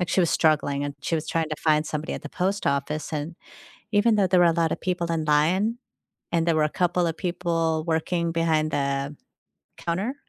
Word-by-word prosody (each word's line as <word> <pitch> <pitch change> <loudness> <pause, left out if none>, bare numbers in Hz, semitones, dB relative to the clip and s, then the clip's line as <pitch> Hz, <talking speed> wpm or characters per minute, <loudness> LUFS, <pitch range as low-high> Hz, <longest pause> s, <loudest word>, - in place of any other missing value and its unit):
like 180 - -1
she - - +3
was 170 - +2
struggling, 145 -3 +2
and 145 0 -4
she 155 +4 -1
was 155 - -4
trying 165 -1 0
to 155 - -2
find 155 -1 +3
somebody 150 0 -3
at - - -7
the 150 - -7
post 190 +2 -1
office, 140 +3 -1
and 155 +2 -4 0.6
even 215 +2 +4
though 200 -2 +3
there 185 0 +4
were - - +6
a 165 - +3
lot 165 -1 +1
of - - -2
people 175 -2 -1
in 160 -2 -1
line, 180 +10 +2 0.6
and 170 -1 +2
there 165 -2 +2
were 155 - +3
a - - +1
couple 175 +1 +1
of 165 - -2
people 165 -3 -1
working 170 +1 0
behind 160 -2 +1
the 140 0 -1 0.6
counter, 190 +10 -2
165 Hz, 215 wpm, -25 LUFS, 155-175 Hz, 0.6 s, were